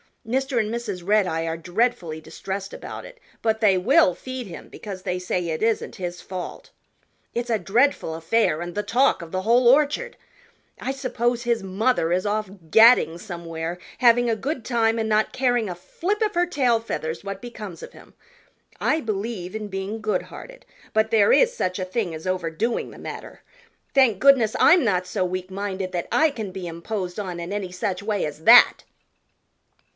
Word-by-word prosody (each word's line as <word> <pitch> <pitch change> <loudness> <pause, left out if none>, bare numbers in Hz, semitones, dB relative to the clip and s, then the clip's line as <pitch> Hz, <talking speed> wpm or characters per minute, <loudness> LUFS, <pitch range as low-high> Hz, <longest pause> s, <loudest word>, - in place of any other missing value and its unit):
Mr. 265 +1 0
and 215 0 -1
Mrs. 205 -7 -4
Redeye 185 -6 +2
are 165 0 -2
dreadfully 175 -3 -1
distressed 195 +4 -6
about - - -8
it, - - -13 0.2
but 220 -1 +1
they 200 -4 +4
will 275 - +4
feed 255 -1 -6
him 175 -4 -10
because 195 -4 -8
they 180 -1 -2
say 180 -1 -2
it 155 - -3
isn't 225 0 0
his 175 -3 -5
fault. 185 -1 -7 0.6
It's 240 +1 -3
a 225 -2 +1
dreadful 235 - +1
affair 165 0 +1
and 175 0 -5
the 210 - -1
talk 260 0 +2
of 165 -1 -9
the 185 0 -2
whole 235 +3 +4
Orchard. 300 - +3 0.6
I 265 - -2
suppose 245 -3 -1
his 235 -2 0
mother 195 -2 0
is 185 +2 +1
off 210 -1 -1 0.2
gadding 220 -6 +6
somewhere, 170 -2 -6 0.2
having 245 -1 +5
a 225 - +2
good 265 +2 -4
time 230 -1 +1
and 220 0 -1
not 215 0 +1
caring 245 -5 +1
a 180 - -4
flip 380 - -3
of 425 -2 0
her 350 +1 +3
tail 255 -9 +2
feathers 160 -7 -4
what 195 -1 -6
becomes 215 -7 -8
of - - -10
him. - - -16 0.7
I 315 - +1
believe 205 -3 -4
in 215 -1 -5
being 195 +3 -4
goodhearted, - - -4 0.3
but 220 0 +2
there 210 -3 +5
is - - +4
such 185 - -2
a 185 - -2
thing 185 -2 -2
as 160 +2 -8
overdoing 185 +5 -1
the - - -13
matter. - - -8 0.5
Thank 255 -8 +4
goodness 260 -5 +5
I'm 350 -2 +6
not 185 -6 +1
so 185 - -1
weak 185 0 -4
minded 190 -1 -4
that 175 -1 -2
I 315 +1 +4
can 220 -8 -6
be 185 -1 -6
imposed 180 +3 -5
on 180 -4 -4
in 170 +2 -6
any 195 -3 -3
such 185 0 -3
way 210 -1 -1
as 150 +1 -7
that." 240 +6 +7
210 Hz, 180 wpm, -23 LUFS, 180-240 Hz, 0.7 s, that